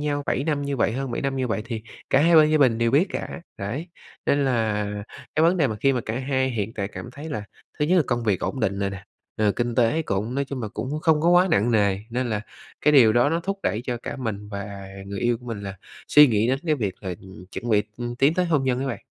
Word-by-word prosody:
nhau 145 -1 -1
7 135 - 0
năm 145 -2 0
như 140 -1 -2
vậy, 115 - +1
hơn 135 +2 -3
7 - - -3
năm 135 -1 -1
như 130 -1 -1
vậy, 110 -1 -1
thì 115 -2 -4 0.3
cả 135 - +5
hai 165 +1 +5
bên 155 -1 +7
gia 155 - +3
bình 125 -5 +4
đều 115 0 +2
biết 155 +9 +4
cả. - - -5 0.2
Đấy, 130 - -4 0.4
nên 140 0 +3
là 110 -5 +1 0.5
cái 155 - +3
vấn 170 +3 +4
đề 155 - +3
mà 110 -4 -3
khi 135 - +4
mà 125 - 0
cả 110 +3 -2
hai 130 0 0
hiện 110 -3 -3
tại 100 -2 -3
cảm 115 - -8
thấy 150 +4 -8
là 105 -7 -4 0.3
thứ 150 - +2
nhất 185 +4 +3
là 175 - +5
công 120 -2 -1
việc 100 -4 +1
ổn 135 - -3
định 100 0 0
rồi 100 -1 -1
nè, 95 0 -8 0.3
rồi 105 -1 +2
kinh 120 +1 -2
tế 125 +6 +2
cũng 110 0 -2
nói 140 - 0
chung 135 -3 -5
là 105 - -3
cũng 145 +4 -3
không 155 -1 +3
có 170 - +2
quá 180 +2 +5
nặng 115 -3 +3
nề 100 -4 +2
nên 125 +1 -1
là 105 -1 -1 0.4
cái 150 - +4
điều 120 -7 +7
đó 120 +5 +3
nó 165 +1 0
thúc 195 +3 -3
đẩy 110 - 0
cho 120 -1 -2
cả - - -5
mình 105 -5 -4
và 100 -1 -7 0.2
người 100 0 -5
yêu 120 -1 +1
của 125 - -15
mình 115 -3 -4
là 100 0 -6 0.3
suy 150 0 +8
nghĩ 110 -3 +2
đến 130 +1 +1
cái 155 - +3
việc 105 -8 -2
là, 95 -2 -3
ừm, 95 -1 -12
chuẩn 120 - -5
bị, 105 -1 +4
ừm, 120 0 -5
tiến 140 +5 +3
tới 180 - +2
hôn 150 -5 +1
nhân 130 -1 +1
á 135 - -2
bạn. 120 -7 -5
125 Hz, 280 wpm, -24 LUFS, 105-145 Hz, 0.5 s, suy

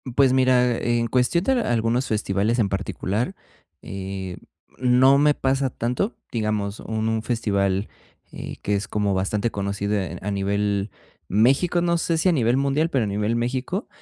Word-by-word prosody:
Pues, 135 -2 +4
mira, 125 -2 +3
en 120 0 0
cuestión 125 +8 +1
de 270 - +3
algunos 120 - 0
festivales 105 +2 0
en 105 -3 +2
particular, 100 - -2 0.5
eh, 95 -1 -6 0.4
no 130 +2 +5
me 145 +1 +4
pasa 135 -1 0
tanto, 125 - -2 0.2
digamos, 105 -2 -2
un 110 0 -2
festival, 100 -5 0 0.4
eh, - - -7
que 105 - 0
es 100 0 -2
como 105 -2 0
bastante 100 +4 0
conocido 100 0 -2 0.3
a 105 - -3
nivel 100 0 -1 0.4
México, 135 - +3
no 170 0 +2
sé 165 0 0
si 185 - +3
a - - +4
nivel 120 -6 +2
mundial, 140 +4 +1
pero 130 -5 +1
a - - -2
nivel 105 +3 -1
México, 130 - -2
115 Hz, 155 wpm, -23 LUFS, 100-130 Hz, 0.5 s, no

